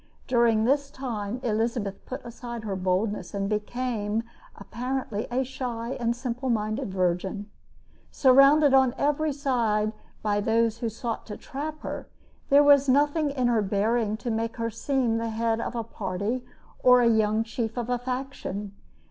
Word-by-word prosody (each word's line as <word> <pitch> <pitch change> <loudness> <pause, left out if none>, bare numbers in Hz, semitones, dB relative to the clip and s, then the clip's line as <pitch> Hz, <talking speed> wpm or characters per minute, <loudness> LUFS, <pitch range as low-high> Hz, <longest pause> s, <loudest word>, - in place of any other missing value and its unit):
During 235 -3 +3
this 280 +2 +2
time 240 -5 -4
Elizabeth 225 -3 -1
put 260 +2 -6
aside 235 -1 -7
her 200 -3 -3
boldness, 185 +1 -1
and 195 0 -1
became 215 0 -2 0.3
apparently 245 -3 -4
a 255 +2 0
shy 245 -2 -4
and 235 -1 0
simple 250 +1 -3
minded 215 0 -1
virgin. 190 +3 -1 0.6
Surrounded 275 +2 +6
on 265 -1 +4
every 295 +2 +1
side 230 -7 0 0.3
by 205 -1 +1
those 225 +1 +1
who 235 - -1
sought 230 +1 -5
to 210 - -6
trap 305 +2 -6
her, - - -5 0.4
there 285 +1 +7
was 285 -1 +6
nothing 290 +3 +3
in 265 -3 -1
her 235 -2 +3
bearing 215 +2 0
to 235 +1 -3
make 225 +1 -2
her 230 0 -2
seem 235 0 0
the 230 0 -2
head 225 0 0
of 235 - -4
a 230 - -1
party 210 +3 -3 0.4
or 250 -1 +6
the 230 - +5
young 215 0 +2
chief 225 0 -4
of 240 -1 -2
a 245 -1 0
faction. 250 -6 -4
230 Hz, 155 wpm, -26 LUFS, 215-260 Hz, 0.6 s, there